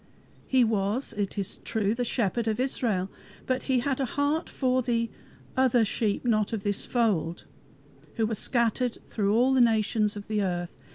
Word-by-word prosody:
He 260 -2 +4
was, 220 +3 0
it 205 0 -3
is 195 -2 -1
true, 215 -2 -1
the 245 +1 -1
Shepherd 230 -1 0
of 220 +1 0
Israel, 220 -7 0 0.3
but 255 -1 0
he 255 -2 +3
had 275 0 -1
a 270 - +1
heart 290 +4 +1
for 255 -1 +1
the 230 -2 -1 0.4
"other 250 -3 +4
sheep 210 +2 -1
not 215 -2 +1
of 210 -3 -3
this 205 -1 -1
fold," 190 -9 0 0.7
who 225 - +1
were 220 - -2
scattered 235 +2 0
through 205 -1 0
all 255 +3 +4
nations 220 -3 +2
of 205 - -8
the 215 -1 0
earth. 175 -2 -2
225 Hz, 170 wpm, -27 LUFS, 205-250 Hz, 0.7 s, He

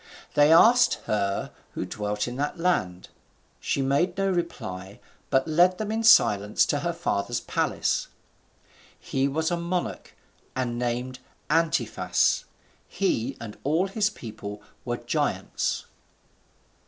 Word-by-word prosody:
They 145 +1 +5
asked 240 +9 +6
her 100 -2 -1 0.2
who - - -2
dwelt 105 +3 -3
in 120 - -5
that 145 +5 -2
land. 95 - -1 0.5
She 135 - -1
made 160 +8 +1
no 195 0 +1
reply, 100 - -4 0.3
but 135 +2 +2
led 175 +4 +4
them 215 -1 -3
in 225 +1 -1
silence 105 - +5
to - - 0
her - - -1
father's 100 +4 -1
palace. - - -1 0.9
He 135 0 -1
was 160 +4 -1
a 175 - +1
monarch, 175 +1 -3 0.4
and 120 -2 -2
named 125 +1 -2 0.3
Antiphas. 165 0 +1 0.4
He 135 - -1
and 110 -3 -9
all 160 +6 +2
his 210 +1 +1
people 105 - -8 0.2
were 120 -1 -2
giants. 120 0 -2
135 Hz, 125 wpm, -26 LUFS, 110-175 Hz, 0.9 s, asked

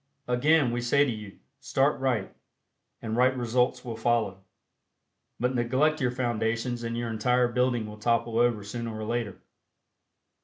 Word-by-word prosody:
Again, 135 +2 +3
we 120 0 -2
say 140 +4 +3
to 135 - -1
you: 105 -3 -8 0.2
Start 135 +1 +1
right, 125 -7 -1 0.7
and 110 -1 -2
right 130 +2 +3
results 125 +1 0
will 115 -2 -4
follow; 110 -4 0 1.0
but 125 +2 0
neglect 130 +6 +1
your 125 - +2
foundations 120 0 -1
and 115 0 -3
your 120 -1 -2
entire 125 +3 +2
building 125 -1 +1
will 105 0 -9
topple 115 0 +1
over 120 -3 +2
sooner 115 +1 -5
or 110 - -5
later. 115 -3 -3
120 Hz, 150 wpm, -27 LUFS, 115-125 Hz, 1.0 s, Again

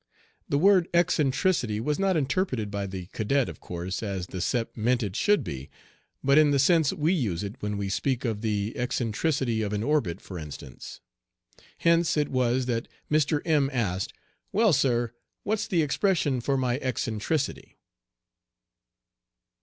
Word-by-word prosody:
The 140 - +2
word 185 +1 +5
eccentricity 150 - +2
was 150 +8 -1
not 195 -3 +2
interpreted 135 - -1
by 100 -1 -3
the 95 -2 -6
cadet, 130 +4 +1
of - - -8
course, 90 +2 -5
as 100 -4 -3
the 90 0 -6
Sep 115 +4 -1
meant 120 +2 +1
it 100 -2 -4
should 205 -8 +3
be, 70 - -6 0.5
but 140 +2 +5
in 155 -1 +5
the 140 - +3
sense 160 +1 +4
we 155 +4 +1
use 105 - -1
it 100 +1 -5
when 105 0 -2
we 100 -1 -2
speak 130 +6 -1
of 110 -3 -2
the 105 -1 -1
eccentricity 125 0 0
of 105 -1 -2
an 105 +1 -1
orbit 115 - 0
for 90 -3 -8
instance. 70 -5 -9 0.8
Hence 170 -1 +3
it 150 - +1
was 130 0 +1
that 115 -2 -2 0.2
Mr. 150 -1 +2
M 150 -4 +3
asked, 100 -8 -1 0.4
"Well, 215 -2 +4
sir, 120 -4 +1 0.3
what's 220 +1 -1
the 175 -7 +2
expression 150 -4 +1
for 135 +3 0
my 125 0 0
eccentricity?" 130 +2 -2
125 Hz, 155 wpm, -27 LUFS, 105-155 Hz, 0.8 s, word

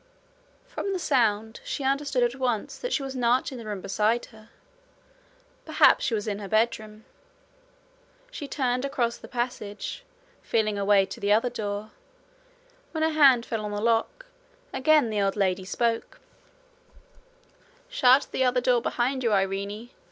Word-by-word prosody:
From - - -4
the - - -1
sound, 225 - 0
she 285 - -4
understood 275 -1 0
at 240 0 +1
once 245 -5 -2
that - - -4
she 280 - 0
was 270 0 -6
not 245 +1 +1
in 255 - -7
the 230 - -9
room 205 -3 -4
beside 215 +5 0
her. 220 0 -17 1.1
Perhaps - - +4
she 235 - 0
was 210 0 -3
in 205 -1 -2
her 200 - -6
bedroom. 215 0 -1 1.3
She 290 - -7
turned 255 -3 -1
across 240 -4 -1
the - - -12
passage, 240 - -4 0.4
feeling 215 -2 0
her 200 - -2
way 200 -1 +5
to - - -9
the 200 - 0
other 230 +4 +3
door. 210 -2 -4 1.0
When 315 -1 -1
her 320 - +3
hand 270 -6 +5
fell 225 -3 -3
on 210 - -3
the 205 0 -3
lock, 230 - 0 0.5
again 295 -4 +3
the 210 -1 0
old 195 0 0
lady 190 -2 0
spoke: 230 +3 -2 1.7
'Shut 260 - +4
the 260 - 0
other 250 0 +2
door 245 -1 +2
behind 255 +2 -1
you, 230 - +1
Irene. 200 +4 -1
235 Hz, 160 wpm, -26 LUFS, 210-260 Hz, 1.7 s, way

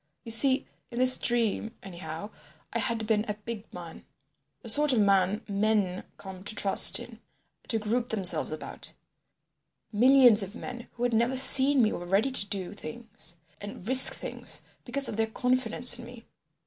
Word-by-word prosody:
You 230 - -9
see—in 260 0 -1
this 255 +1 +5
dream, 230 -1 -2
anyhow—I 175 +1 -10
had 230 -3 -2
been 215 -1 0
a 210 - -4
big 215 0 -9
man, 170 -2 -11 0.6
the - - -10
sort 295 +4 +3
of 240 - +1
man 200 0 +1
men 200 -2 -1
come 190 -1 -11
to 215 - -6
trust 195 -2 +5
in, - - -12 0.5
to 225 - -1
group 230 +3 -3
themselves 180 -9 -2
about. 155 - -9 1.0
Millions 245 0 +5
of 195 +2 -7
men 245 -1 -9
who 240 - -7
had 245 -1 -1
never 235 +4 0
seen 265 0 +6
me 215 - 0
were 175 - -7
ready 200 +9 0
to 255 - 0
do 195 -2 -6
things 225 -7 -10 0.3
and 205 -1 -10
risk 260 +1 +7
things - - -5 0.2
because 270 +2 +2
of 210 - -6
their 225 0 0
confidence 250 +1 0
in 240 - -10
me. 240 -1 -14
220 Hz, 160 wpm, -27 LUFS, 200-245 Hz, 1.0 s, risk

